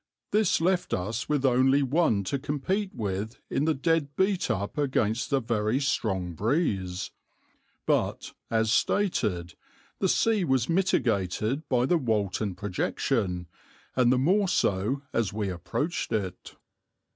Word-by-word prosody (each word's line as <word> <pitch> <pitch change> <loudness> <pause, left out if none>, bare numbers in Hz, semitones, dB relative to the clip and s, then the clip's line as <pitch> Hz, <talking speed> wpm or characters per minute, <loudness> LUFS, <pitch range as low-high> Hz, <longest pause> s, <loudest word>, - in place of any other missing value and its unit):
This 210 -3 +3
left 180 +2 +1
us 105 +6 -3
with 145 -2 +1
only 130 +2 +4
one 135 -7 +2
to 135 +9 -2
compete 155 +9 -1
with 105 +2 -4
in 145 - +1
the 160 -1 +2
dead 150 -1 0
beat 190 -1 +1
up 100 +1 -2
against 125 -6 0
a 140 - +3
very 115 0 0
strong 95 -10 -1
breeze, 95 - -1 0.7
but, - - 0 0.2
as 110 -1 +1
stated, 105 - +1 0.5
the 190 - +1
sea 220 -1 +2
was 130 -6 +1
mitigated 130 - 0
by 125 -1 +3
the 170 +5 +2
Walton 105 - -1
projection, 95 0 -1 0.5
and 125 -1 +4
the 130 - +3
more 190 +10 +3
so 115 - 0
as 110 -5 0
we 105 -2 -2
approached 95 - -3
it. 95 -5 -3
125 Hz, 135 wpm, -27 LUFS, 100-150 Hz, 0.7 s, only